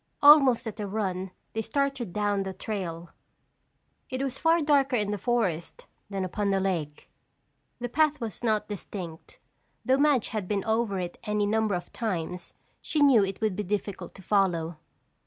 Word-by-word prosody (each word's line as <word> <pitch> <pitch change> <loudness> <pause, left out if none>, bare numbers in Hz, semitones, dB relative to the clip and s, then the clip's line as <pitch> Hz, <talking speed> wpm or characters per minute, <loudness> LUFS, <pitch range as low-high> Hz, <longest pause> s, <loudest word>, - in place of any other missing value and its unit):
Almost 275 -5 +7
at 220 -2 -6
a 205 - -2
run 190 -2 -2 0.2
they 220 - -1
started 265 -2 -1
down 205 0 0
the 190 -1 -4
trail. 175 -5 -5 1.0
It 260 +1 -2
was 270 -1 -3
far 330 +1 +4
darker 285 -4 +3
in 210 -3 0
the 205 - -2
forest 190 -8 -1 0.2
than 195 -2 -2
upon 200 +3 -1
the 195 0 +2
lake. 170 -6 -3 0.7
The 245 - -3
path 300 +4 +2
was 225 -3 -6
not 215 -2 +1
distinct. 185 -5 -7 0.5
Though 260 +1 +3
Madge 285 -5 +3
had 215 -5 -3
been 200 -1 -1
over 220 -2 0
it 175 -1 -4
any 210 -1 +1
number 215 -1 +1
of 175 - -6
times, 180 -5 -4 0.3
she 300 -2 +1
knew 255 -7 +6
it 195 +1 -4
would 215 -4 +1
be 210 - -2
difficult 200 -2 -4
to 195 - -12
follow. 175 -5 +1
210 Hz, 170 wpm, -27 LUFS, 190-240 Hz, 1.0 s, Almost